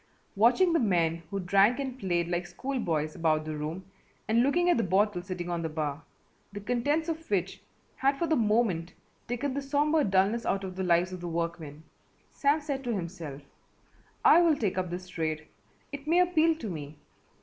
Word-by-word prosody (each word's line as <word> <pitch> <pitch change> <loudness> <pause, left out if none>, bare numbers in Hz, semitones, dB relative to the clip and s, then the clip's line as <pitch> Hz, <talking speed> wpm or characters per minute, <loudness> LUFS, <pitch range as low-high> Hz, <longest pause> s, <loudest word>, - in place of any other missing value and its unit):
Watching 250 - +4
the 335 - +3
men 170 -6 +1
who 200 - -3
drank 195 +5 +3
and 265 -2 -4
played 175 -5 0
like 175 0 -2
school 265 +7 -4
boys 155 -6 -1
about 155 -2 +1
the 155 0 -4
room, 155 +5 -5 0.4
and 225 +2 +3
looking 330 +7 +2
at 350 - +4
the 230 - +1
bottle 190 0 +1
sitting 180 -1 -5
on 170 -1 -2
the 160 - -2
bar, 155 -1 -3 0.5
the 205 - -6
contents 250 +9 0
of 325 -1 -4
which 190 -2 -1 0.4
had 275 +1 +2
for 340 - 0
the 320 -1 +2
moment 210 - +1 0.3
taken 245 +3 -2
the 280 - -2
sombre 295 +3 +2
dulness 200 +3 +2
out 195 +1 -1
of 185 -1 -6
the 190 - -2
lives 180 +1 +2
of 180 - -7
the 175 - -5
workmen, 165 -3 -4 0.5
Sam 290 +2 +1
said 280 -2 -4
to 240 -2 -1
himself, 170 -6 -6 0.8
"I 345 - +8
will 330 -3 +4
take 195 -6 -1
up 180 -1 -2
this 180 +1 -6
trade. 155 -3 -3 0.5
It 285 0 -8
may 335 +2 +3
appeal 335 -2 +3
to 260 -8 -7
me. 150 -5 -7
195 Hz, 195 wpm, -29 LUFS, 170-275 Hz, 0.8 s, I